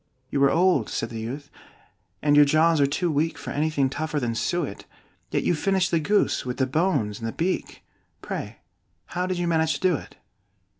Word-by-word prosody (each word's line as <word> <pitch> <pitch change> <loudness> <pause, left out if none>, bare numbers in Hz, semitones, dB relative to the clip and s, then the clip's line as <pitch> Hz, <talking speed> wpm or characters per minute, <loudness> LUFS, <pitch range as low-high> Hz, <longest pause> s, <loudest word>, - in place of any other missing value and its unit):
"You 140 - +2
are - - +5
old," 170 - +3
said 115 - -3
the 115 - -5
youth, 135 +6 -6 0.7
"and 145 -1 +4
your 145 - +8
jaws 155 +2 +3
are 140 - +4
too 170 +5 0
weak 155 +3 0
For - - -7
anything 150 -2 +1
tougher 150 +3 -2
than 120 -3 -1
suet; 145 -1 -2 0.4
Yet - - 0
you - - +2
finished 190 +3 +1
the 165 - +3
goose, 205 +7 +1
with 125 -1 -4
the 130 - +2
bones 135 - 0
and 115 - -4
the - - -2
beak: 180 +8 -3 0.4
Pray, - - -6 0.5
how 180 +1 -1
did 185 -1 -2
you 175 - -1
manage 160 -2 +2
to - - -5
do 185 -2 +3
it?" - - -12
155 Hz, 200 wpm, -25 LUFS, 135-175 Hz, 0.7 s, your